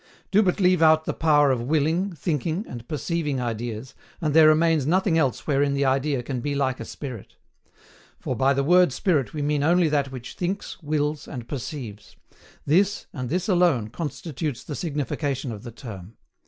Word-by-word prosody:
Do 205 - +5
but 190 -1 +1
leave 180 -2 +3
out 160 0 +5
the - - -1
power 145 -3 +4
of 125 -3 0
willing, 160 +8 0
thinking, 165 - -2
and 120 -1 -9
perceiving 150 -2 -2
ideas, 120 +1 -4 0.3
and 155 -4 -1
there 160 0 +7
remains 155 -2 +3
nothing 185 +1 +2
else 135 -7 +1
wherein 140 -1 +1
the 140 0 +1
idea 135 0 +1
can 125 0 -4
be 145 +2 -2
like 130 -2 0
a - - -6
spirit. 125 -8 -8 0.8
For, 130 - -3
by 135 +4 +2
the 140 - +1
word 180 +1 +5
spirit 150 - 0
we 150 - -2
mean 145 0 +1
only 170 +2 +3
that 140 -2 0
which 125 -2 -8
thinks, 185 +3 -4
wills, 150 -1 -1
and 120 -5 -7
perceives; 120 -5 -7 0.5
this, 195 +7 +2
and 125 -3 -4
this 175 +4 -1
alone, 175 - +2
constitutes 150 -1 -4
the 150 - -6
signification 140 -3 -2
of 105 -2 -7
the 120 - -8
term. 110 -4 -10
145 Hz, 180 wpm, -24 LUFS, 130-165 Hz, 0.8 s, there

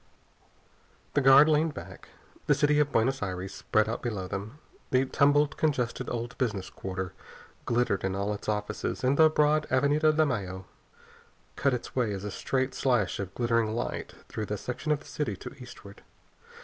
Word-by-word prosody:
The 145 - +3
guard 135 +3 +8
leaned 155 0 +2
back. - - -10 0.4
The - - +5
city 150 0 +3
of 145 -1 +2
Buenos 130 +4 +1
Aires 95 -1 -4
spread 110 0 +1
out 115 - -3
below 105 -6 -3
them. 105 +9 -6 0.3
The 130 +1 +3
tumbled, 145 +1 +3
congested 130 -7 -1
old 120 0 -4
business 105 -7 -2
quarter 95 -1 -5 0.5
glittered 120 -5 +1
in 95 0 -1
all 100 +1 -1
its 105 - -6
offices, 105 +3 -3
and 130 +2 +3
the 160 +1 +6
broad 150 0 +2
Avenida 145 +4 +3
de 155 0 +3
Mayo 95 -8 -3 0.9
cut 140 -2 +2
its 120 - -8
way 120 -5 +1
as 95 0 -5
a 105 - -4
straight 130 +6 -1
slash 120 -8 +1
of 95 -1 -5
glittering 115 -2 +1
light 120 - -4
through 110 -1 -4
the 105 - -2
section 125 +8 -4
of 150 -1 +1
the - - -16
city 125 -10 -3
to - - -9
eastward. 105 -5 -12
120 Hz, 175 wpm, -28 LUFS, 105-145 Hz, 0.9 s, guard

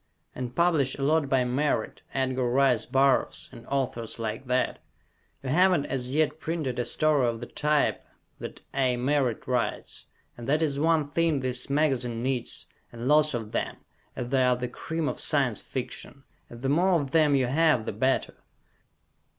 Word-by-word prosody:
And 125 -1 -6
publish 160 -6 +3
a 135 - -4
lot 150 0 +2
by 130 -2 +3
Merritt, 130 +5 -1
Edgar 130 -2 0
Rice 130 -2 +2
Burroughs, 135 0 +2
and 115 - -13
authors 125 -4 -2
like 115 +3 -4
that; 130 0 0 0.6
you 130 - -4
haven't 175 0 +4
as 125 -2 -3
yet 155 +2 +1
printed 155 -7 -3
a 120 - 0
story 150 -5 +2
of 115 -1 -2
the 120 - -6
type 150 +3 0 0.4
that - - -8
A. 130 -2 +1
Merritt 130 -2 0
writes, 125 -2 -2 0.3
and 120 +2 -7
that 155 +3 +3
is 140 -3 0
one 155 -2 +2
thing 165 -3 +1
this 130 0 -3
magazine 130 -5 0
needs, 130 -2 -2 0.3
and 120 +1 -6
lots 150 -1 +4
of 110 -2 -5
them, - - -2 0.4
as 120 -1 -4
they 135 0 +2
are 125 -1 +4
the 125 0 -3
cream 160 +5 -4
of - - -3
Science - - +1
Fiction, - - -6 0.3
and 120 +1 -11
the 135 - +1
more 175 +4 +3
of 140 -2 -4
them 150 -2 +4
you 130 -2 +2
have, 145 -3 +2
the - - -2
better! 130 +6 0
135 Hz, 175 wpm, -27 LUFS, 125-150 Hz, 0.6 s, haven't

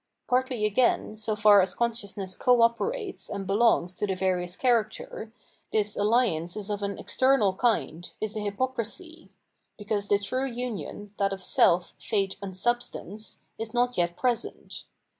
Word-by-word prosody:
Partly 250 -3 +1
again, 215 0 +2
so 215 0 -2
far 210 -1 +7
as 185 0 -1
conscious 230 -4 -2
ness 190 -2 -3
co 245 -2 +4
operates 390 - -1
and 200 -1 -4
belongs 195 -3 +3
to 210 - -1
the 190 - -1
various 180 -1 -1
characters, 225 -2 0 0.4
this 210 -1 +1
alliance 205 -6 +1
is 210 0 -4
of 205 0 -2
an 200 0 -2
external 260 -7 +2
kind, 190 -6 0
is 215 0 -3
a - - -2
h3rpocrisy 260 - -4 0.2
— - - -49
because 205 -1 -2
the 205 - +4
true 255 +7 -2
union, 230 -4 -5
that 195 -1 +2
of 190 -1 -6
self, 175 0 +3
fate, 195 -3 -1
and 190 -2 -6
substance, 220 -1 -3 0.2
is 225 +1 -5
not 245 0 +2
yet 175 -1 0
present. 245 -3 -2
210 Hz, 160 wpm, -27 LUFS, 195-240 Hz, 0.4 s, far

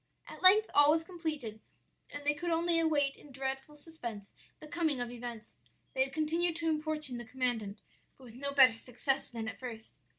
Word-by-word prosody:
"At - - -10
length 420 +4 +7
all 290 0 +7
was 320 +1 +4
completed, 310 - -5 0.5
and 290 0 -8
they 295 - +3
could 345 +4 -4
only 335 0 +2
await 290 -4 +2
in 295 - -15
dreadful 270 +2 -4
suspense 245 -10 -8 0.3
the 305 - -10
coming 315 -4 0
of 245 -1 -3
events. 235 -2 -7 0.4
They 265 - +3
had 265 - -6
continued 320 +3 +1
to 330 -1 0
importune 305 -5 -2
the - - -6
commandant, 225 -4 -2 0.4
but 265 - -17
with 235 -3 -12
no 280 +3 -1
better 265 -4 +7
success 250 +3 -2
than 225 -2 -5
at 220 - -6
first. 230 -3 -8
280 Hz, 190 wpm, -32 LUFS, 245-315 Hz, 0.5 s, length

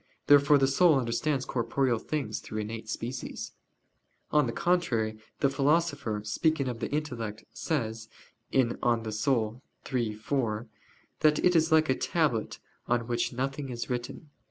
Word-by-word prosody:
Therefore 145 0 +6
the 135 - +3
soul 150 +3 +4
understands 130 +3 0
corporeal 120 0 0
things 135 -8 -3
through 110 - -7
innate 110 +1 -6
species. 120 +3 -5 0.8
On 150 -3 +4
the - - -1
contrary, 115 -11 0 0.2
The 140 - +4
Philosopher, 145 -7 +1
speaking 140 +6 +1
of 120 -2 -3
the 115 - -3
intellect, 125 -8 -3
says 115 -7 -3 0.4
(De 135 - +5 0.2
Anima 115 -2 +1 0.8
iii, 120 -4 0
4) 110 -1 -2 0.5
that 150 -1 +4
it 180 -1 +4
is 160 0 +3
like 160 0 +5
"a - - +2
tablet 145 -11 0 0.3
on 120 -1 +1
which 120 0 -1
nothing 135 +2 -3
is 120 0 -4
written." 125 +5 -5
130 Hz, 140 wpm, -29 LUFS, 115-150 Hz, 0.8 s, Therefore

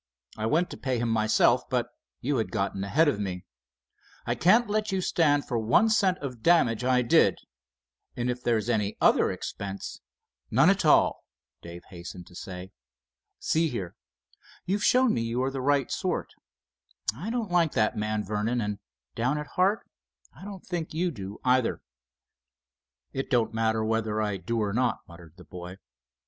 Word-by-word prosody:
I 110 0 -2
went 165 +8 +1
to - - -7
pay 130 -2 -1
him 120 0 -1
myself, 110 +2 +3
but 120 -1 0 0.3
you 140 +2 0
had 110 -5 -2
gotten 95 -1 -2
ahead 155 +11 +3
of 140 -8 +1
me. 95 -3 -4 0.8
I - - 0
can't 220 +7 +4
let 210 0 -1
you 190 - 0
stand 150 -5 +2
for 120 -3 -1
one 120 - +3
cent 195 -4 +3
of 125 -5 -6
damage 125 -9 +3
I 125 0 +3
did, 120 - +4 0.8
and 120 0 -2
if 125 0 -2
there's 115 -3 0
any 105 -3 0
other - - +4
expense——" 100 0 -6 0.5
"None - - +5
at - - 0
all," - - +4 0.4
Dave 85 +1 -10
hastened 90 0 -9
to 90 - -17
say. 90 +1 -8 0.7
"See 160 +1 +1
here, 95 -9 -5 0.7
you've 200 +3 -1
shown 255 -1 +4
me 115 - 0
you 115 +2 -1
are 135 - 0
the 135 -1 -4
right 140 -1 +1
sort. - - -2 0.8
I 175 - -5
don't 230 -5 -2
like 170 -3 +3
that 110 - +1
man 105 0 -1
Vernon, 105 +4 -1
and 105 -2 -3 0.3
down 125 +6 0
at 150 0 -5
heart 195 +4 +1 0.5
I - - -13
don't 195 -2 -9
think 170 -4 -4
you 175 +2 0
do, 100 -6 -7
either." 125 -1 +2 1.3
"It 135 - -3
don't 120 -4 +1
matter 110 -1 +1
whether 110 -1 0
I 105 -2 -1
do 110 +5 -2
or 100 -1 -2
not," 125 0 0
muttered 85 -2 -14
the 90 - -12
boy. 90 +1 -9
120 Hz, 170 wpm, -27 LUFS, 105-155 Hz, 1.3 s, None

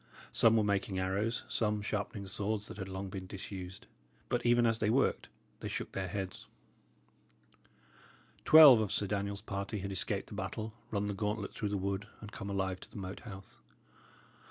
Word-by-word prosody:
Some 115 0 +5
were 110 - +4
making 100 -1 0
arrows, 100 +5 0
some 105 -2 0
sharpening 100 -1 -3
swords 105 +2 -2
that - - -9
had 95 -2 -5
long 95 +1 -4
been 95 -2 -6
disused; 95 -1 -7 0.4
but 120 0 0
even 120 0 +4
as 115 -1 +2
they 105 - +2
worked, 135 +5 +2 0.3
they - - -5
shook - - -4
their 95 -1 -3
heads. 95 0 -5 2.0
Twelve 150 -6 +10
of 105 - -1
Sir 105 - +1
Daniel's 100 0 -2
party 100 +1 -3
had 100 0 -4
escaped 100 +1 -2
the - - -9
battle, 110 +2 -4 0.2
run 105 -1 -1
the 105 - -1
gauntlet 105 +1 -2
through 105 -3 -2
the 100 - -1
wood, 100 +2 -2
and 105 -1 -9
come 100 - -6
alive 95 -2 -1
to - - -11
the - - -11
Moat 95 0 -5
House. 95 - -10
100 Hz, 180 wpm, -33 LUFS, 95-110 Hz, 2.0 s, Twelve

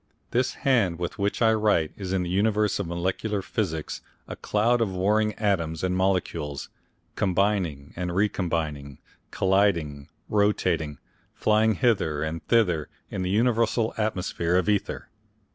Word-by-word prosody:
This 125 +2 +1
hand 115 - +2
with 90 +4 -4
which 100 +4 0
I 110 0 +5
write 105 -8 +2
is 95 -2 -5
in 95 -1 +1
the 85 - -4
universe 105 +2 +1
of 100 - -2
molecular 95 +4 -2
physics 80 -3 -3 0.3
a - - -6
cloud 115 +3 +1
of 110 - +1
warring 105 +3 +1
atoms 85 -7 -1
and 90 0 0
molecules, 90 -6 -1 0.5
combining 90 -7 0
and 90 0 -3
recombining, 80 -8 -1 0.3
colliding, 90 -8 +1 0.2
rotating, 90 -8 +1 0.4
flying 110 0 +3
hither 95 - +1
and 80 +1 -4
thither 90 -10 +2 0.2
in 95 - -3
the 90 - -1
universal 115 +1 +2
atmosphere 90 -5 -1
of 90 -1 +2
ether. 105 -2 -1
95 Hz, 135 wpm, -26 LUFS, 85-105 Hz, 0.5 s, I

